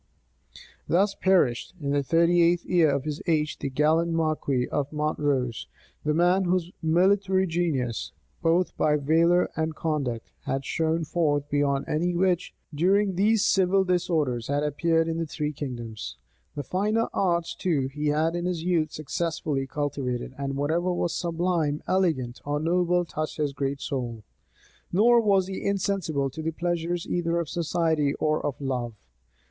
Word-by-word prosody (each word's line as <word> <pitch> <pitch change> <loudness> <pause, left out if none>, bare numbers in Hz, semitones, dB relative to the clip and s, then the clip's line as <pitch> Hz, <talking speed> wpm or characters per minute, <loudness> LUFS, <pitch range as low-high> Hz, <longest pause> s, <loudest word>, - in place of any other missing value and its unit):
Thus 195 +4 +2
perished, 180 -7 +1
in 140 -2 -2
the 145 0 +2
thirty 170 +4 +3
eighth 170 +1 +3
year 170 -4 +3
of 140 -1 0
his 150 0 -4
age, 155 -2 0
the 140 - -3
gallant 155 +5 +2
marquis 155 -6 0
of 145 -1 -2
Montrose; 145 -5 -1 0.4
the 150 0 +1
man 180 +3 +3
whose 180 -1 0
military 190 +3 +3
genius 160 - -1 0.3
both 170 +2 +2
by 150 -1 +3
valor 165 +5 +3
and 160 0 -2
conduct 140 -9 -2
had 135 0 -2
shone 160 +1 0
forth 150 -3 0
beyond 140 -1 +1
any 175 +3 0
which, 180 -1 +1 0.2
during 190 +6 +2
these 205 +3 +3
civil 190 0 +3
disorders, 160 -10 0
had 145 +1 0
appeared 165 +3 +1
in 165 0 -2
the 165 - -2
three 150 0 -3
kingdoms. 115 - -6 0.4
The 145 - -3
finer 210 - 0
arts, 170 -3 0
too, 155 -8 0
he 150 +2 -3
had 155 +3 +1
in 175 0 -2
his 175 -3 -2
youth 165 -4 +1
successfully 155 -2 -2
cultivated; 135 -4 -3
and 140 0 -3
whatever 160 +6 0
was 175 -1 -1
sublime, 170 -3 -1
elegant, 155 -10 0
or 145 0 -1
noble 175 +2 +1
touched 155 -1 -4
his 150 -2 -1
great 140 +1 -2
soul. 120 -5 -4 0.7
Nor 235 +6 +5
was 200 -4 +3
he 190 0 -6
insensible 185 -8 -1
to 160 - -7
the 160 - -1
pleasures 175 +1 -2
either 170 -1 -1
of 165 -3 -3
society 160 -4 0
or 155 0 0
of 145 - -3
love. 125 -4 -3
160 Hz, 155 wpm, -26 LUFS, 145-175 Hz, 0.7 s, Nor